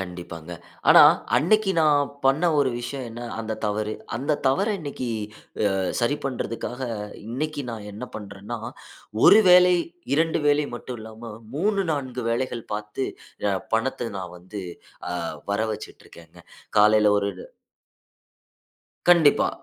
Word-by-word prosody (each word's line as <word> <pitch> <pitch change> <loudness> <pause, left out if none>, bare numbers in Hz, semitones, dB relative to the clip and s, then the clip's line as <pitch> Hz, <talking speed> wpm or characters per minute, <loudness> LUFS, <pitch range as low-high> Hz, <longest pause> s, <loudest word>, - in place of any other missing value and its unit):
கண்டிப்பாங்க. 90 -2 -7 0.4
ஆனா, - - +9 0.4
அன்னைக்கு 215 +5 +3
நான் 145 -3 +3 0.2
பண்ண 135 +5 +3 0.2
ஒரு 140 -2 +3
விஷயம், 130 +2 -5
என்ன? 120 +2 -8 0.2
அந்த 110 0 -4
தவறு. 105 +1 -1 0.2
அந்த 140 +5 -1
தவற 140 +11 +2
இன்னைக்கு, 140 -4 -5 0.6
அ - - -1 0.3
சரி 120 +5 +1
பண்றதுக்காக, 125 -1 -4 0.5
இன்னைக்கு 145 +4 -3
நான் 110 -3 -7
என்ன 110 +5 -7
பண்றேன்னா, 100 +3 -7 0.7
1 215 - +9
வேலை, 180 0 +7 0.4
2 160 +2 +2
வேலை 145 0 +3
மட்டும் 120 0 -7
இல்லாம 110 +1 -9 0.2
3,4 155 - -1
வேலைகள் 120 -1 -2
பாத்து, 105 +5 -4 0.4
அ, - - +1 0.2
பணத்தை 120 +1 -1
நான் 90 -2 -7
வந்து, 95 +3 -8 0.5
அ - - -3 0.4
வர 100 - 0
வச்சுட்டிருக்கேங்க. 85 -5 -11 0.4
காலையில 105 0 +6
ஒரு 100 0 -1 1.8
கண்டிப்பா. 170 -5 +6
120 Hz, 120 wpm, -24 LUFS, 105-145 Hz, 1.8 s, ஆனா